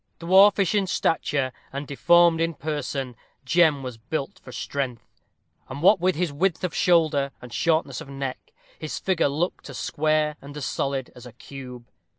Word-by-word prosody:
Dwarfish 190 +2 +5
in 200 -2 +1
stature, 145 -6 0 0.2
and 140 +2 -5
deformed 170 +4 +4
in 165 -1 0
person, 140 -4 -4 0.3
Jem 155 -1 +3
was 125 -3 -7
built 135 +4 -4
for 125 - -12
strength; 125 -2 -4 0.6
and 140 +4 -6
what 195 +2 +6
with 185 +1 +1
his 170 -2 -1
width 175 +4 0
of 180 - -2
shoulder 155 -5 +3
and 125 -1 -11
shortness 155 -1 0
of - - -10
neck, 135 -1 -6 0.3
his 155 - -5
figure 185 -6 +1
looked 155 +2 -3
as 135 - -7
square 155 0 0
and 145 +1 -10
as 145 - -4
solid 135 +4 -2
as 125 0 -11
a - - -11
cube. 125 -3 -10
145 Hz, 165 wpm, -24 LUFS, 135-170 Hz, 0.6 s, what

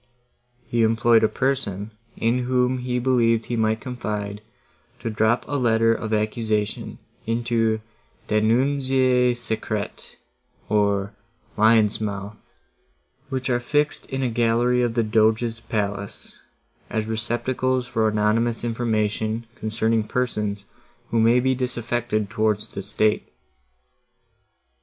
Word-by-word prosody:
He 120 - 0
employed 115 +1 +4
a - - +6
person, 110 -7 -1 0.3
in 115 +2 +1
whom 125 0 +1
he 125 0 -2
believed 120 -3 +2
he 120 - -3
might 110 -1 +1
confide, 105 -5 -4 0.6
to 115 - -3
drop 110 +3 +1
a 145 +1 -1
letter 115 -2 +3
of 110 -1 -4
accusation 110 -1 -1 0.3
into 115 -1 +1 0.4
the 110 0 +1
Denunzie 130 +1 +2
secrete, 110 -3 -3 0.5
or 100 -1 +1 0.4
lions' 110 0 +4
mouths, 100 0 -4 0.9
which 130 -1 -3
are 120 - +2
fixed 150 +4 -1
in 135 0 -3
a - - +2
gallery 120 +2 +2
of 120 -2 0
the 115 - +2
Doge's 110 +1 +2
palace, 100 -2 -4 0.5
as 110 -1 -1
receptacles 120 +3 -1
for 110 -3 0
anonymous 110 +2 +1
information, 110 -1 -1
concerning 110 -1 0
persons, 105 -5 -2 0.5
who 115 - +2
may 115 +2 +5
be 130 +1 +2
disaffected 120 -3 -1
towards 105 0 -1
the 100 - -4
state. 105 +2 0
115 Hz, 115 wpm, -23 LUFS, 110-125 Hz, 0.9 s, a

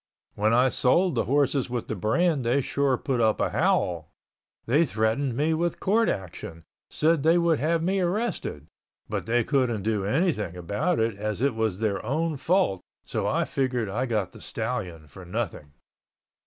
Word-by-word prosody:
When 105 +2 +1
I 125 +3 +4
sold 170 +9 +3
the - - 0
horses 140 -1 +1
with 120 -2 -3
the 110 - -3
brand 140 - +1
they 120 +4 +2
sure 135 0 0
put 125 -2 -1
up 110 -1 +2
a - - 0
howl. 85 -3 +1 0.6
They 145 +8 +3
threatened 115 0 0
me 155 +3 +2
with 170 +2 -1
court 220 +4 +2
action, 85 -3 -5 0.3
said 160 0 +2
they 165 +4 +4
would 170 -3 +2
have 165 +2 +1
me 190 +3 +1
arrested, 185 - -2 0.4
but - - -4
they 120 +1 +2
couldn't 120 -6 0
do 105 -2 0
anything 105 - 0
about 100 - -1
it 115 -1 +1
as 105 0 -3
it 140 -2 +2
was 110 -4 -1
their 105 -2 -1
own 155 +7 -1
fault 160 - +1 0.2
so - - -2
I - - +1
figured 125 -5 -1
I 120 +7 -1
got 105 -6 -1
the - - -14
stallion 90 -10 -4
for 90 +6 -12
nothing. 75 -4 -5
125 Hz, 175 wpm, -26 LUFS, 105-155 Hz, 0.6 s, I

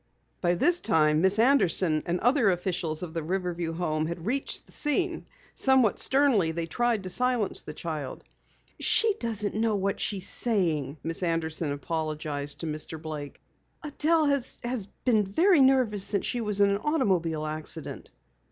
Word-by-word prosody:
By 175 -1 +2
this 350 - +3
time, 155 -5 +3
Miss 190 +3 +3
Anderson 190 - +3
and 175 +1 0
other 245 -2 +4
officials 180 -3 -2
of 165 -3 -7
the 165 - -2
Riverview 175 -1 -3
Home 155 -2 -1
had 170 0 -6
reached 270 +5 -2
the - - -20
scene. 335 +4 -1 0.3
Somewhat 260 -5 +3
sternly 260 - +3
they 165 0 -3
tried 230 +4 0
to 185 - -5
silence 250 -4 0
the 150 - -9
child. 155 -6 -5 0.6
"She 445 -1 +3
doesn't 215 -3 -2
know 220 0 +1
what 195 0 -1
she 205 - -1
is 190 - -1
saying," 165 - 0
Miss 165 +2 -3
Anderson 165 -3 -1
apologized 150 -1 -4
to - - -4
Mr. 155 +1 -5
Blake. 150 -2 -7 0.4
"Adelle 310 +2 +1
has 255 -5 -2 0.2
been 225 -5 +4
very 320 - +3
nervous 255 -7 +3
since 200 -1 -1
she 245 - -2
was 210 -2 +2
in 200 0 +5
an 200 - +1
automobile 185 - 0
accident." 155 +1 -6
190 Hz, 160 wpm, -27 LUFS, 160-240 Hz, 0.6 s, in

